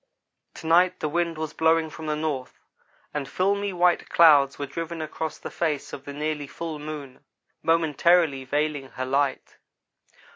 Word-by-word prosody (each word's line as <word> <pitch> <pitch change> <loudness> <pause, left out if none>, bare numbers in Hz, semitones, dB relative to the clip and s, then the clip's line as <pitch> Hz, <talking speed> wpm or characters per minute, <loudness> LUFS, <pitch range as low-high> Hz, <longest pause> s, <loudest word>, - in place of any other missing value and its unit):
To - - -10
night 180 +3 +4
the 155 - -1
wind 170 +1 -1
was 160 -1 -4
blowing 160 0 +2
from 160 0 -8
the 150 - 0
north, 150 -4 -4 0.5
and 145 -2 -3
filmy 200 +4 0
white 180 -1 +2
clouds 145 -5 +6
were 145 - -3
driven 165 +4 -5
across 155 0 -4
the - - -8
face 155 -4 -2
of 140 - -8
the 140 - -7
nearly 150 0 -3
full 160 +1 -6
moon, 150 -3 -8 0.4
momentarily 165 -2 +3
veiling 145 0 -1
her 130 - -3
light. 135 +1 -1
155 Hz, 155 wpm, -25 LUFS, 145-165 Hz, 0.5 s, clouds